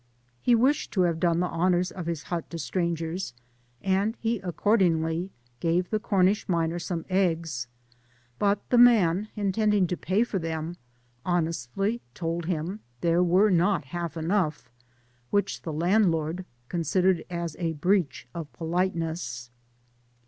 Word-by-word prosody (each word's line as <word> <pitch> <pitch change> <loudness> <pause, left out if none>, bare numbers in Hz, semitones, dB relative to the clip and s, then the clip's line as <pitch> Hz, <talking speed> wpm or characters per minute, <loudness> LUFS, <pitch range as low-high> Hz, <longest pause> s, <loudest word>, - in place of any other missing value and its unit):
He 245 - +4
wished 265 +5 +2
to 190 - +2
have 170 -2 +1
done 170 0 +2
the - - +2
honours 180 +1 +1
of 180 -3 -6
his 165 -3 -3
hut 170 -2 -4
to 170 - -5
strangers, 165 -2 -2 0.5
and 195 +4 +1
he 230 -1 0
accordingly 175 -3 +1 0.3
gave 175 +2 0
the 215 - +1
C(»iiish 200 -1 +2
miner 170 -1 +1
some 170 -1 -4
eggs, 165 -9 0 0.7
but 205 0 +1
the 245 - +5
man, 210 -5 +5
intending 210 -1 +2
to 180 - -2
pay 190 +6 +1
for 220 -5 -2
them, 165 0 -3 0.5
honestly 175 - -1
told 165 0 -2
him 180 +3 -2 0.2
there 170 +1 +3
were 185 +4 +4
not 180 -3 +2
half 170 +2 -4
enough, 160 -6 -1 0.6
which 200 -1 0
the 165 - -5
landlord 170 0 +1 0.2
considered 180 +3 +1
as 170 -2 -3
a 165 -2 -1
breach 175 -3 0
of 165 -3 -6
politeness. 165 -8 -2
175 Hz, 135 wpm, -27 LUFS, 165-195 Hz, 0.7 s, the